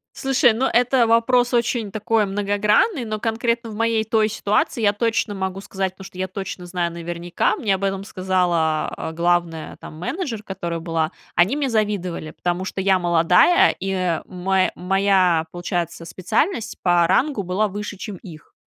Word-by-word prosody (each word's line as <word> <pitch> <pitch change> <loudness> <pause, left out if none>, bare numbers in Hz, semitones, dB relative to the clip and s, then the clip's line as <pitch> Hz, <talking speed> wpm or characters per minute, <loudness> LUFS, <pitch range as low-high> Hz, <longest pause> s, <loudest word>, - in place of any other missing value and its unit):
Слушай, 265 -2 +3
ну, 235 +4 0
это 245 0 +3
вопрос 245 +2 +3
очень 235 -2 0
такой 215 +1 0
многогранный, 205 - +1
но 215 -1 -3
конкретно 230 +1 -1
в 215 - -8
моей 230 0 +1
той 220 0 +2
ситуации 210 +2 0
я 205 -2 +4
точно 225 0 -1
могу 190 0 -3
сказать, 190 -1 -3
потому 190 - -12
что 185 - -12
я 185 0 -2
точно 190 -1 -6
знаю 175 -1 -2
наверняка, 170 +1 -2
мне 205 -3 0
об 190 - -6
этом 195 0 -2
сказала 175 -5 -1
главная 170 -1 0
там 155 - -10
менеджер, 225 - -4
которая 170 -4 -4
была, 165 -1 -1 0.2
они 185 +10 +3
мне 285 -2 -1
завидовали, 200 -8 -1
потому 175 +1 -2
что 190 - -4
я 190 -1 +3
молодая, 175 - +4
и 185 -3 -1
мо 185 +1 0
моя, 185 -3 +2
получается, 175 -1 -3
специальность 225 - -1
по 175 -1 +4
рангу 270 - +1
была 190 +4 0
выше, 205 +1 -5
чем 200 0 -7
их. 165 -4 -13
195 Hz, 160 wpm, -21 LUFS, 175-225 Hz, 0.2 s, я